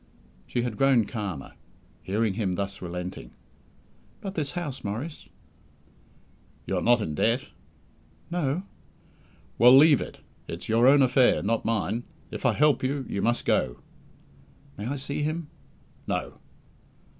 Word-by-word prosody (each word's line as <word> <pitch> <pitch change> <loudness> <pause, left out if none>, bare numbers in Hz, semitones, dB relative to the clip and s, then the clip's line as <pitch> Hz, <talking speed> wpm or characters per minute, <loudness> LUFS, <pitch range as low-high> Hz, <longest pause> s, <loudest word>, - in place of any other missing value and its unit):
She 120 - -1
had 120 -4 -3
grown 135 -5 +4
calmer, 100 - -5 0.5
hearing 105 +2 0
him 95 -4 -1
thus 100 0 -4
relenting. 90 0 -6 0.8
"But 195 -2 -6
this 150 -6 -2
house, 150 -7 -4
Maurice?" 120 +11 -5 1.4
"You - - -1
are - - 0
not 120 -1 +4
in 80 -7 -3
debt?" 115 - 0 0.8
"No." 170 0 -1 1.0
"Well, 125 +3 +9
leave 145 -1 +6
it. - - -7 0.3
It's - - -7
your 115 +3 +4
own 140 +1 +7
affair, 130 0 +4
not 115 +2 0
mine. 110 +1 -1 0.3
If - - -1
I - - +3
help 150 -2 +3
you, 135 +1 -1
you 100 - -3
must 120 +1 0
go." - - +1 1.0
"May 105 - -5
I 140 - -2
see 140 +1 -4
him?" 155 +1 -2 0.6
"No." - - -3
120 Hz, 135 wpm, -27 LUFS, 105-140 Hz, 1.4 s, Well